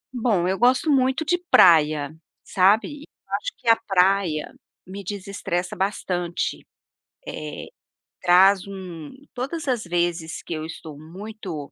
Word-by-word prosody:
Bom, 220 -8 +1
eu 190 +1 -1
gosto 255 +5 +3
muito 265 +3 +2
de 355 +3 +1
praia, 155 -3 +5 0.3
sabe. 210 +10 +2 0.3
Acho - - -3
que 235 - -15
a 230 - +7
praia 190 -6 +1 0.3
me 195 +2 -8
desestressa 190 -2 -4
bastante, 180 -3 -2
eh, - - -22 1.6
traz 190 +2 +5
um 180 - -8 0.2
todas 275 +6 -4
as 245 -7 -1
vezes 170 -1 -2
que - - -6
eu 155 0 -4
estou 160 -2 -9
muito, 180 -2 -8
190 Hz, 125 wpm, -23 LUFS, 170-225 Hz, 1.6 s, a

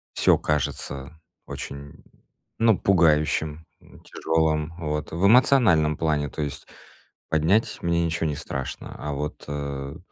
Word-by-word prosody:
Всё - - +4
кажется 70 -2 -2 0.3
очень, - - -6
м, 70 0 -13 0.5
ну, 115 -3 +4
пугающим, 80 -3 +2 0.2
м, - - -18
тяжёлым. 80 0 -1
Вот 75 -2 -3
в 85 +4 +1
эмоциональном 100 - +5
плане, 75 -2 0
то 75 - -5
есть 70 -2 -5 0.6
поднять 80 +8 +2
мне 85 0 +1
ничего 80 0 -1
не 75 - -3
страшно, 65 -1 -6
а 75 0 -4
вот 75 +1 -5
э 70 +1 -5
75 Hz, 130 wpm, -24 LUFS, 75-85 Hz, 0.6 s, эмоциональном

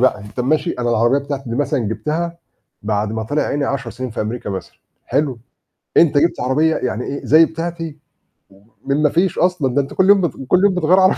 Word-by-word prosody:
بقى، 130 -4 +2
أنت 105 +4 -7
ماشي 155 +7 +1
أنا 120 -1 -2
العربيّة 120 +4 +3
بتاعتي 140 -3 -5
مثلًا 145 +4 0
جبتها 155 +10 -3 0.4
بعد 105 0 -1
ما 110 0 -2
طلع 145 +7 -1
عيني 145 0 -1
10 130 -3 -3
سنين 125 +3 -6
في - - -5
أمريكا 110 0 -4
مثلًا 95 -3 -6 0.3
حلو، 135 -2 0 0.6
أنت 155 -3 +5
جبت 170 - +1
عربيّة 150 +6 +2
يعني 125 -1 -2
إيه، 140 - -5
زي 160 +3 +6
بتاعتي، 165 -1 -5 0.9
من 140 +2 +1
ما 150 - +5
فيش 180 +5 +1
أصلًا. 170 -8 +1
ده 140 - +4
أنت 135 - -8
كل 190 +1 +2
يوم 200 -1 +6
بت 175 -5 0 0.2
كل 180 - +4
يوم 195 -2 +3
بتغير 180 +2 +3
عربيّة" 185 0 +4
140 Hz, 205 wpm, -19 LUFS, 120-165 Hz, 0.9 s, زي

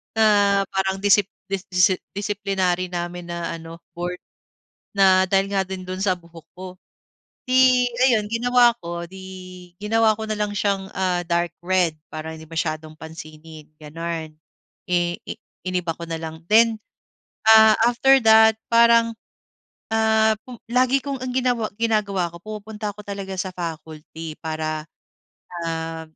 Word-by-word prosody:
na 220 - +3 0.5
parang 190 0 -1
disip 205 -1 +4 0.2
disi 185 -1 +2 0.2
disiplinary 195 -3 -1
namin 175 0 -5
na 170 -1 -4
ano 165 0 -10 0.2
board. 175 +1 -4 0.7
Na 190 -2 +5
dahil 195 0 +2
nga 195 -1 +2
'din 185 -1 -7
dun 185 +1 -5
sa 185 -3 +1
buhok 170 -1 -15
ko. 185 0 -7 0.8
'Di 255 -1 +5 0.2
ayun 220 -5 +2
ginawa 240 0 +4
ko 170 0 -5
'di, 190 +2 -12 0.6
ginawa 220 +1 +2
ko 220 - -4
na 215 - -2
lang 210 0 -1
siyang, 195 -2 -1
ah, 185 -2 0
dark 170 0 0
red 180 -2 +1 0.2
para 160 +1 -6
hindi 160 0 -11
masyadong 155 -1 -4
pansinin, 160 -1 -11
gano'n. 160 +1 -6 0.6
Eh, 175 -1 0
i - - -3 0.3
iniba 180 -2 -1
ko 170 +1 -9
na 165 0 -3
lang 160 0 -7
then, 225 0 +5 0.7
Ah, 220 -1 +8
after 270 +3 +4
that 220 0 +7
parang, 230 0 +5 0.8
ah, 220 0 +3
pum 250 - -8 0.2
lagi 255 +2 +3
kong 275 -2 -4
ang 255 -1 -3
ginawa 245 -4 +1
ginagawa 205 -6 0
ko 170 - -9
pumupunta 215 0 -6
ko 210 - -10
talaga 195 -1 -5
sa 190 -1 -3
faculty 160 -1 -7
para, 155 -1 -3 0.8
ah, 165 0 -4
190 Hz, 140 wpm, -22 LUFS, 170-220 Hz, 0.8 s, Ah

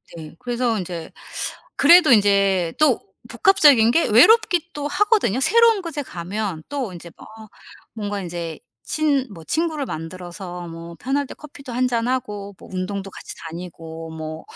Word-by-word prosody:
네. 155 -2 -10
그래서 245 -2 -1
인제 175 -4 -6 0.7
그래도 335 0 +7
인제 200 -5 +3
또 300 -5 +4 0.3
복합적인 295 - +5
게 330 +7 +2
외롭기도 345 - +4
하거든요. 410 - +2
새로운 455 - +4
곳에 315 -5 -5
가면 185 - -5
또 265 -9 -3
인제 170 0 -10
막 - - -13 0.7
뭔가 205 -2 -4
인제 170 -3 -6 0.2
친 290 -4 0
뭐 165 -3 -11
친구를 315 - -1
만들어서 175 +2 -7
뭐 165 0 -9
편할 280 +2 -1
때 - - -8
커피도 280 -4 -11
1 255 +1 +1
잔하고 230 -5 -2
뭐 - - -14
운동도 195 +1 -4
같이 - - -9
다니고 165 -1 -8
뭐 160 0 -6
215 Hz, 285 characters per minute, -22 LUFS, 175-285 Hz, 0.7 s, 그래도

